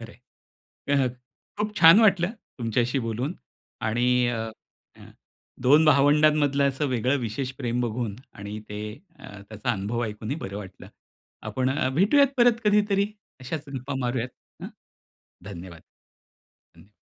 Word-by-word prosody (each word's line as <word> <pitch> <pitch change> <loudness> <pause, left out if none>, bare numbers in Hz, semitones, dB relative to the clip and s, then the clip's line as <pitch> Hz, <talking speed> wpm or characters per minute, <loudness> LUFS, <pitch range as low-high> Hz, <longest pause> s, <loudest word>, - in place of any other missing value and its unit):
खरंय. 115 +1 -11 0.7
अ, 140 -2 +3 0.5
खूप 210 0 -2
छान 170 +5 +8
वाटलं, 195 -4 +4 0.3
तुमच्याशी 120 +3 0
बोलून. 120 - -3 0.5
आणि 125 +3 +2
अ, 115 -2 -3 1.1
2 145 +5 +6
भावंडांमधलं 145 -1 +4
असं 140 +2 -2
वेगळं 130 +2 +1
विशेष 120 +3 -3
प्रेम 125 -2 -1
बघून 120 -2 -2 0.2
आणि 100 +1 -7
ते 105 0 -6 0.4
त्याचा 105 +4 -9
अ, - - +2
अनुभव 110 +4 -2
ऐकूनही 110 +6 -5
बरं 100 -10 -6
वाटलं. 95 -3 -10 0.6
आपण 130 0 -1
अ, 135 -1 0
भेटूयात 275 - +4
परत 240 -1 +4
कधीतरी 205 -1 +3 0.3
अशाच 145 +4 -5
गप्पा 135 0 -5
मारूयात. 120 0 -1 0.3
हं. - - -5 0.8
धन्यवाद. 85 -1 -10 0.9
धन्य 105 - -19
130 Hz, 125 wpm, -25 LUFS, 115-155 Hz, 1.1 s, छान